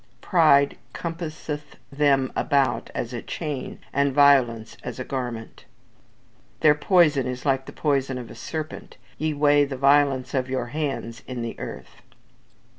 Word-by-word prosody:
"Pride 145 -5 +4 0.2
compasseth 155 -3 -6 0.2
them 140 -2 +2
about 135 -6 +1
as 120 +1 -3
a 120 - -4
chain, 150 -5 -5 0.2
and 140 0 +2
violence 130 -5 +4
as 125 -2 -6
a 130 - -4
garment." 120 -4 -5 1.0
"Their 150 - +7
poison 150 -4 +3
is 125 +1 -5
like 135 -1 +1
the - - -7
poison 135 -3 0
of 120 -3 -8
a - - -8
serpent. 155 -1 -6 0.2
Ye 155 -1 -1
weigh 145 0 +4
the 140 -2 -4
violence 140 -1 +3
of 130 -1 -1
your 130 -2 -1
hands 135 -7 -3
in 125 -2 -4
the 115 - -4
earth." - - -8
140 Hz, 145 wpm, -24 LUFS, 125-150 Hz, 1.0 s, Their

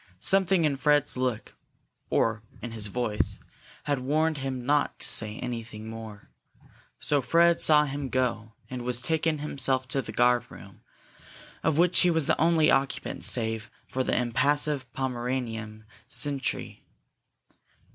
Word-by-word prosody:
Something 190 - +2
in 140 -2 0
Fred's 145 0 +2
look, 125 -3 -2 0.6
or 115 -1 +1 0.2
in 120 - -7
his 110 -2 0
voice, 110 -1 -1 0.5
had 145 -2 -1
warned 155 +3 0
him 130 -2 -4
not 145 +1 +1
to - - -1
say 110 -1 +2
anything 115 -3 -6
more. 110 -2 -10 0.7
So 145 -1 +1
Fred 170 +5 +3
saw 150 -1 +5
him 140 -1 -4
go, 120 -3 -1
and 125 -1 -6
was 120 0 0
taken 160 +4 0
himself 135 -3 -1
to 135 +2 +1
the - - -8
guard 120 -1 +2
room, - - -14 0.8
of 155 -1 +1
which 175 +1 +4
he 180 - +5
was 160 -3 +2
the - - +1
only 160 -2 +4
occupant 135 0 -1
save 110 -3 0 0.2
for 130 - -2
the - - 0
impassive 140 +2 +1
Pomeranian 120 -4 -4 0.2
sentry. 140 -3 -1
130 Hz, 140 wpm, -27 LUFS, 120-150 Hz, 0.8 s, saw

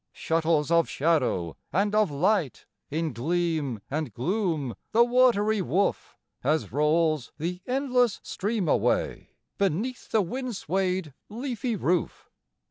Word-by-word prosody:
Shuttles 160 -2 +1
of 170 -1 +4
shadow 125 - +1 0.2
and 200 +6 +1
of 215 -2 +3
light 155 - 0 0.2
In 160 0 -2
gleam 155 - -1
and 155 +2 -3
gloom 160 - -1 0.2
the 235 +2 +6
watery 235 -4 +3
woof 190 +2 -1 0.3
As 155 +4 0
rolls 155 -1 +1
the 180 +3 -3
endless 250 -4 +1
stream 205 -2 -2
away - - 0 0.2
Beneath 200 +7 -1
the 220 -2 +3
wind 250 +5 -4
swayed 185 -3 -1 0.2
leafy 240 0 -3
roof. 180 -3 -1
175 Hz, 120 wpm, -27 LUFS, 155-215 Hz, 0.3 s, the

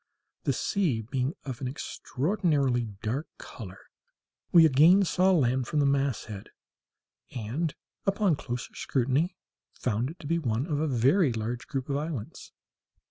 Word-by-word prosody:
(the - - +3
sea 175 - 0
being 130 - -2
of 130 -1 -6
an 130 - -2
extraordinarily 140 - 0 0.2
dark 130 +8 -2
colour), 95 -5 -9 0.7
we 165 -2 +8
again 160 +7 +6
saw 185 +2 +3
land 130 -7 +2
from 150 - 0
the 145 - +3
masthead, 135 -7 -1 0.9
and, 130 +8 -2 0.3
upon 195 -2 +3
a - - +2
closer 120 -3 -5
scrutiny, 140 +8 0 0.4
found 120 +1 -1
it 165 - -10
to - - -11
be 165 +3 +1
one 120 -3 -1
of 150 -3 -1
a 160 - +1
group - - -2
of 130 - -1
very 140 - +4
large 115 +3 -4 0.2
islands. 145 -4 -4
140 Hz, 145 wpm, -28 LUFS, 120-165 Hz, 0.9 s, we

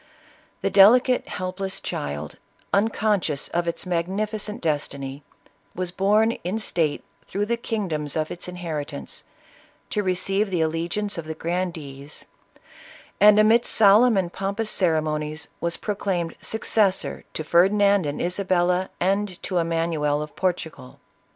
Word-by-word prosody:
The 195 - 0
delicate, 245 +6 +6
helpless 185 +1 -4
child, 75 +1 -5 0.3
un 200 +3 +4
conscious 200 -10 -1
of 175 0 -1
its 170 - -2
magnificent 205 +5 -2
destiny, 140 -3 -3 0.5
was 180 -1 -2
borne 210 +4 +3
in 180 +5 -2
state 165 -8 -1 0.2
through 205 +1 -1
the 235 +2 0
kingdoms 185 - -3
of 155 -1 -1
its 175 - -5
inheritance, 160 - -5 0.7
to 210 - +1
receive 195 +2 +1
the 180 -3 -1
allegiance 170 +5 -1
of 165 - -6
the 160 0 -5
grandees, 160 -5 -5 0.9
and 210 +1 +7
amidst 220 +3 +4
solemn 220 +2 +6
and 175 -2 -1
pompous 200 +3 -1
ceremonies 155 -3 0
was 170 0 0
proclaimed 195 -5 -2
successor 210 -3 0
to 155 - -2
Fer 170 +4 +4
dinand 200 -4 +3
and 145 - -3
Isabella, 180 0 +1
and 195 0 0
to 180 -2 0
Emanuel 165 -3 0
of 150 - -11
Portugal. 160 -8 -3
180 Hz, 130 wpm, -24 LUFS, 160-205 Hz, 0.9 s, and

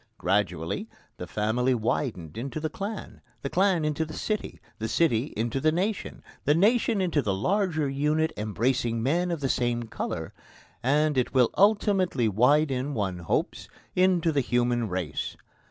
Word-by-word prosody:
Gradually, 90 -5 -1 0.3
the - - -6
family 120 +5 +1
widened 110 - -2
into 135 +6 -4
the 155 0 -3
clan, 200 +4 -6 0.2
the 140 - -3
clan 185 -4 +2
into 150 +1 0
the 155 0 -7
city, 215 -1 -3 0.2
the 110 - -2
city 125 -5 +2
into 115 +4 -1
the 155 +3 +3
nation, 195 +5 -2 0.2
the 145 - +3
nation 220 +3 +3
into 170 -5 +1
the 100 -6 -1
larger 165 - +1
unit 150 +3 0
embracing 115 +2 0
men 175 +7 +1
of 170 -4 -2
the 135 - +1
same 120 -2 0
colour, 115 - -5 0.5
and 145 +2 +2
it 125 - -2
will 125 -3 +4
ultimately 195 - +3
widen, 135 +5 +2
one 95 -5 -2
hopes, 85 - -2 0.3
into 180 -2 +3
the 145 -2 +2
human 120 -2 +1
race. 90 -5 -3
140 Hz, 155 wpm, -27 LUFS, 115-165 Hz, 0.5 s, will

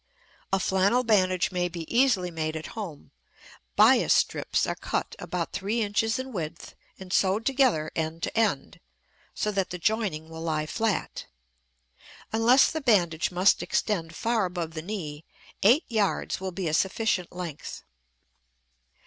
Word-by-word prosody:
A 195 - +2
flannel 190 +7 +2
bandage 185 -6 +2
may 180 -1 -1
be 170 -1 -6
easily 230 -8 +2
made 160 -1 -3
at 160 - -5
home. 190 -10 -7 0.6
Bias - - +5
strips - - +1
are - - -1
cut - - -3
about 175 -2 -4
three 215 +4 -1
inches 220 +3 0
in 260 0 -5
width 165 -3 -6 0.2
and 190 -1 -8
sewed 195 +4 +2
together 255 - +2
end 160 +1 -3
to - - -3
end 215 -11 0 0.6
so 210 - -1
that 195 -2 -1
the 180 - -5
joining 185 -4 -1
will 160 0 -9
lie 155 -2 -1
flat. 220 +5 -2 1.1
Unless 235 +4 +5
the 315 - -3
bandage 175 - +2
must 185 +3 +3
extend 165 -6 -1
far 225 0 +1
above 175 -3 -4
the 160 - -5
knee, 160 -5 -6 0.4
eight 250 - +5
yards 210 -4 -1
will 190 0 -3
be 185 -1 -3
a 155 - -1
sufficient 190 +1 0
length. 175 -5 -7
185 Hz, 150 wpm, -27 LUFS, 165-220 Hz, 1.1 s, Bias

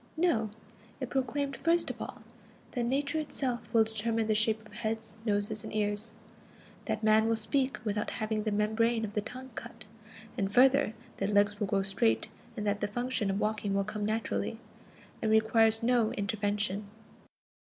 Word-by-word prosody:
No. 280 -11 +2 0.5
It 260 -3 -4
proclaimed 275 +1 -1
first 335 +1 +2
of - - -10
all - - -7 0.5
that 245 -3 -1
Nature 280 +5 0
itself 260 -6 -3
will 225 -1 +6
determine 220 +1 0
the 215 - +2
shape 220 0 +2
of 210 - -16
heads, 220 -1 -3
noses, 205 +1 0
and - - -7
ears; 210 +1 -1 0.7
that 220 -1 -2
man 220 +1 +5
will 225 - +3
speak 260 +5 0
without 210 0 -1
having 215 0 -1
the 215 0 -1
membrane 220 +2 +1
of 205 - -7
the 210 - 0
tongue 255 +4 -8
cut; 220 - -8 0.5
and 195 -1 0
further, 260 0 +5 0.2
that 195 - -1
legs 205 0 +3
will 205 - 0
grow 195 0 +1
straight 190 - +1 0.3
and 210 - -3
that 205 0 0
the 205 - +1
function 240 -1 -1
of 195 +1 0
walking 210 -2 0
will 200 - +2
come 210 +1 -4
naturally, 220 +2 -1 0.6
and 220 - +1
requires 220 0 +4
no 240 -2 +3
intervention. 205 0 -1
220 Hz, 170 wpm, -31 LUFS, 210-235 Hz, 0.7 s, will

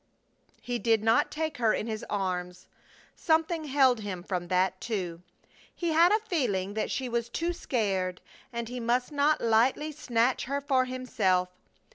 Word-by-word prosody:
He 245 -1 -3
did 225 -3 +2
not 225 +1 +3
take 315 -1 -3
her 225 -3 +3
in - - -3
his 220 -2 -4
arms. 180 -2 -3 0.5
Something 320 0 +1
held 265 -4 +3
him 190 -4 -5
from 180 -2 -3
that, 185 +1 +1
too. 180 -7 -3 0.5
He 345 - -2
had 335 +3 +5
a 425 - +5
feeling 205 - 0
that 215 - -2
she 265 -2 -2
was 235 -1 -2
too 335 +8 -1
sacred, 195 - -1 0.3
and 235 -1 -4
he 250 +2 -5
must 245 +3 0
not 295 +1 +2
lightly 240 +7 +2
snatch 245 -4 0
her 280 +2 -1
for 270 -2 +1
himself. 210 -8 0
235 Hz, 160 wpm, -28 LUFS, 195-280 Hz, 0.5 s, had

